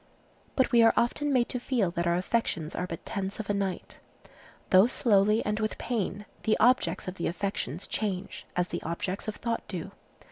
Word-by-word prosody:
But 260 - +2
we 235 - +6
are 225 0 +6
often 285 +5 +1
made 250 -3 +3
to 250 - -2
feel 235 -8 0
that 170 -1 -1
our 170 - +3
affections 180 -4 -1
are 180 - -2
but 165 -2 -7
tents 195 -1 -4
of 205 -1 -2
a - - +1
night. 195 -2 -3 0.7
Though 190 +4 +7
slowly 210 -3 +3
and 210 +1 0
with 215 0 -1
pain, 205 -3 -2 0.2
the 215 - +2
objects 245 -3 +3
of 185 +1 -5
the 170 - -1
affections 180 -3 -3
change, 200 -3 -3
as 180 0 0
the - - -3
objects 180 +5 -3
of 215 - -3
thought 230 -1 -2
do. 185 0 -5
200 Hz, 190 wpm, -28 LUFS, 180-230 Hz, 0.7 s, Though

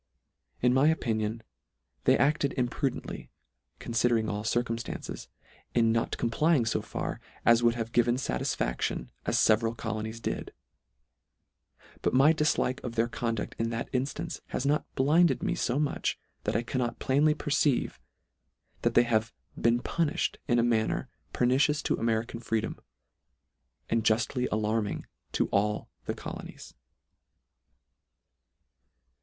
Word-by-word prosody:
In 125 0 +5
my 135 +3 +4
opinion 115 -7 0 0.6
they - - +5
acted 145 0 +2
imprudently, 125 +1 -2 0.5
considering 115 -1 +1
all 105 0 -3
circumstances, 115 - -3 0.5
in 115 -2 +4
not 115 0 0
complying 130 +3 +2
fo 110 - 0
far, - - -4 0.2
as 115 0 +6
would 120 0 +3
have 115 -1 -3
given 120 +1 +3
Satisfaction, - - -2 0.2
as - - +2
leveral 115 +1 +3
colonies 110 +1 -4
did: - - -4 1.5
but - - +1
my 140 +5 +6
diilike 150 -4 +1
of 120 -2 -5
their 115 0 +2
conduct 115 -2 -3
in 115 0 0
that 115 0 -4
inltance, 145 +6 -2
has 130 - -3
not 150 +2 +1
blinded 155 +6 +3
me - - +1
fo 120 - 0
much, 150 -1 0 0.3
that 105 - 0
I 115 - +1
cannot 120 -1 -2
plainly 150 +3 +3
perceive, 145 -3 +1 0.8
that - - +1
they 120 - +7
have 115 -1 0 0.2
been 120 +1 +2
puniShed 170 +1 0
in 120 -3 +3
a 115 - +4
manner 115 -2 +1 0.2
pernicious 135 +4 +2
to - - +1
American 115 0 -1
freedom, 115 -1 -2 1.1
and 115 -1 +1
juStly 120 +3 +1
alarming 110 -1 -1 0.3
to - - +2
all 105 +1 0
the - - -2
colonies. - - -8
120 Hz, 125 wpm, -29 LUFS, 115-135 Hz, 1.5 s, they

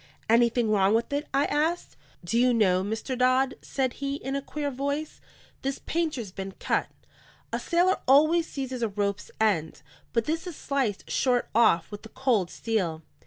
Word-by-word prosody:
"Anything 235 0 +3
wrong 200 0 +4
with 235 +4 -1
it?" 290 +2 -1
I 275 +1 +2
asked. 320 +4 -1 0.3
"Do 225 +7 0
you 250 0 +4
know, 185 -5 +3
Mr. 220 +5 -3
Dodd," 255 +1 +3
said 260 -3 -1
he, 275 0 -1
in 270 -1 -4
a 275 - -1
queer 290 +1 -4
voice, 280 +3 -3 0.4
"this 275 +1 -2
painter's 305 - -2
been 195 0 -6
cut? - - -1 0.7
A - - 0
sailor 360 +2 +2
always 310 +5 +5
seizes 260 -3 -5
a 230 - +2
rope's 200 0 -2
end, 195 -8 0 0.3
but 230 -1 +1
this 325 +4 -2
is 350 - -6
sliced 265 -10 -2
short 250 -2 +1
off 215 -7 +3
with 205 - -7
the 220 - -12
cold 235 -9 +1
steel. 180 -9 -2
250 Hz, 170 wpm, -27 LUFS, 215-280 Hz, 0.7 s, always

